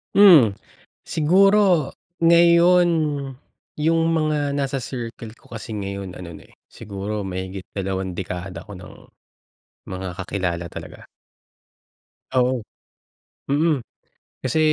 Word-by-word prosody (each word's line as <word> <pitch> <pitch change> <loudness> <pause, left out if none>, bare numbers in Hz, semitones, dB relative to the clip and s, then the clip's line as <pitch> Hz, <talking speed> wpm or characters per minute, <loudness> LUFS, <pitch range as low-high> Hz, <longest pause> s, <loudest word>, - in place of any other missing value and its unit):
Hmm. 160 - +7 0.4
Siguro 185 -1 +3 0.3
ngayon, 170 +1 +5 0.9
yung 165 +2 +2
mga 155 -3 0
nasa 140 -1 -1
circle 115 -3 -6
ko - - -22
kasi 115 -1 -8
ngayon 100 -2 -5
ano 85 -3 -9
na, - - -15
eh, - - -22
siguro 100 +1 -5
mahigit 95 0 -5
dalawang 95 -1 -3
dekada 90 0 -6
ko 100 - -8
ng 90 0 -12 0.9
mga 95 0 -6
kakilala 90 -3 -3
talaga. - - -10 1.3
Oo. 125 -1 +2 0.9
Mm. 150 +1 +2 0.7
Kasi 130 +4 0
115 Hz, 100 wpm, -22 LUFS, 95-160 Hz, 1.3 s, Hmm